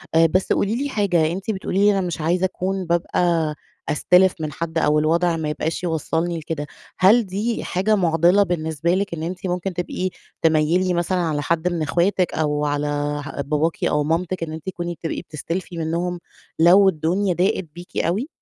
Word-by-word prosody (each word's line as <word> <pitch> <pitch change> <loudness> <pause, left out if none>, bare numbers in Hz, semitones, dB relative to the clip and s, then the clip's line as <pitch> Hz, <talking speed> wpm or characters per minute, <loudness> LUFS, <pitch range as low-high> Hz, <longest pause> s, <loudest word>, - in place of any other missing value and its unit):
آآ، 165 0 +6
بس 185 +4 +2
قولي 205 +3 0
لي 285 - -2
حاجة، 175 - +1
أنتِ 195 +4 -3
بتقولي 195 -1 -2
لي 205 +1 +5
أنا 195 -1 +1
مش 170 -2 -4
عايزة 175 +4 +1
أكون 190 +1 -2
بابقى 170 -2 +1 0.3
أستلف 180 +5 +4
من 155 -1 -3
حد 165 +2 -4
أو 150 -1 +3
الوضع 165 +2 +2
ما 155 -1 -2
يبقاش 160 +3 -3
يوصّلني 165 0 -1
لكده، 150 -1 -5 0.3
هل 215 +5 +5
دي 205 +5 -2
حاجة 195 +4 +1
معضلة 175 +1 +4
بالنسبة 165 -1 -1
لِك 200 -1 -2
إن 160 -1 -4
أنتِ 180 +2 -4
ممكن 180 +1 -2
تبقي 180 +1 -2 0.3
تميِّلي 165 +3 +2
مثلًا 175 +2 0
على 160 -4 0
حد 170 +3 0
من 175 -2 -1
اخواتِك 175 +4 +1
أو 150 -1 0
على 145 0 -1 0.4
ه 145 - -5
باباكِ 150 +3 -1
أو 150 0 +2
مامتِك 165 +3 -1
إن 155 - -5
أنتِ 160 -1 -8
تكوني 175 -2 -4
بتبقي 165 0 -4
بتستلفي 170 +4 -5
منّهم 170 +2 -2 0.4
لو 185 +4 +7
الدنيا 180 +3 0
ضاقت 185 +2 +1
بيكِ 175 +1 -10
أوي؟ 205 - 0
170 Hz, 180 wpm, -22 LUFS, 160-185 Hz, 0.4 s, لو